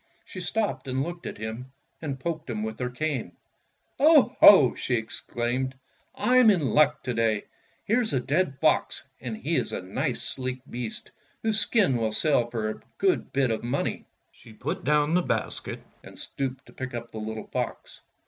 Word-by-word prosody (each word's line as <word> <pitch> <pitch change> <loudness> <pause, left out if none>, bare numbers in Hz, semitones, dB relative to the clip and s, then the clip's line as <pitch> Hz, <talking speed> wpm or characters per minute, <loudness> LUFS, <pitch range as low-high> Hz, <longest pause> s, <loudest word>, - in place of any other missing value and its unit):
She 185 - -8
stopped 205 -3 -2
and 130 +1 0
looked 175 +2 -6
at - - -6
him 115 +4 -6 0.3
and 140 -4 -4
poked 160 0 -4
him 110 -2 -2
with 110 0 -5
hei 125 -1 -1
cane. 130 - -3 0.7
"Oho!" 260 - +7
she 125 - -1
exclaimed, 120 +3 -2 0.4
"I'm 255 -2 +5
in 160 - +2
luck 150 +3 +3
to 125 - -2
day. 115 -2 +1 0.4
Here's 230 +1 +2
a 130 - +1
dead 140 +2 0
fox, 155 -1 +2 0.2
and 120 -4 -5
he 160 +8 -1
is 125 - -1
a - - -3
nice, 125 - -2
sleek 130 -1 -4
beast 120 -2 -6 0.3
whose 220 -1 +2
skin 205 - +3
will 110 -2 -1
sell 125 -3 +2
for 115 -2 -2
a - - -10 0.2
good 380 -2 +1
bit 135 -3 +2
of 110 - -1
money." 125 +4 -2 0.2
She 110 - -16
put - - -4
down 150 +2 +2
the 180 - +4
basket - - -3 0.2
and - - -13
stooped 135 -1 -4
to - - -17
pick 130 -1 -6
up 120 0 -6
the 110 - -6
little 110 0 -5
fox. - - -4
130 Hz, 175 wpm, -26 LUFS, 120-170 Hz, 0.7 s, Oho